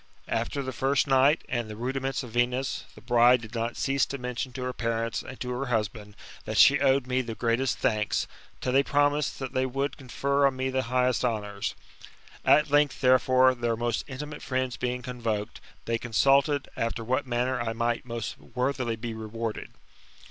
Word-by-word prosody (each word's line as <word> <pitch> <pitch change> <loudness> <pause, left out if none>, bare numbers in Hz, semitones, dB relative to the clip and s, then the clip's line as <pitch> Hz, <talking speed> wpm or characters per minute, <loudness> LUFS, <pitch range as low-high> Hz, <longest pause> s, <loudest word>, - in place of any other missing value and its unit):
After 140 - -2
the 130 0 -4
first 135 +3 +1
night, 135 +2 +4
and 120 -3 -2
the 105 - -6
rudi 130 +4 -2
ments 135 0 -2
of 120 - -9
Venus, 125 +3 0
the 110 - -13
bride 120 +1 +5
did 110 +1 -10
not 115 0 -2
cease 135 0 +1
to 140 - -4
mention 125 0 -4
to 130 - -5
her 125 0 -2
parents 115 -1 -2
and 130 - -10
to 125 - -3
her 130 +2 -3
husband, 105 -3 -2 0.3
that - - -3
she - - +7
owed 135 -1 +3
me 125 0 0
the 115 -3 -6
greatest 120 +2 0
thanks, 110 -5 0 0.4
till 125 - -1
they 135 - +6
promised 145 +1 +1
that 135 -2 -5
they 130 0 +1
would 135 +2 -2
confer 140 +1 +1
on 135 - -1
me 130 0 -1
the 130 0 +1
highest 125 -1 +2
honours. 105 -4 -2 0.7
At 150 -1 +4
length, 145 -1 +3
therefore, 130 0 +5
their 120 -2 -1
most 120 -1 -1
intimate 150 +2 -7
friends 130 -1 -2
being 125 0 -3
convoked, 115 -5 -3 0.2
they 115 0 0
consulted 135 +4 +3
after 115 0 -2
what 130 +4 -1
manner 125 +1 0
I 115 -1 -2
might 120 +1 -1
most 115 -2 -5
worthily 130 -2 -2
be 115 +1 -5
rewarded. 110 0 -5
125 Hz, 185 wpm, -27 LUFS, 115-135 Hz, 0.7 s, she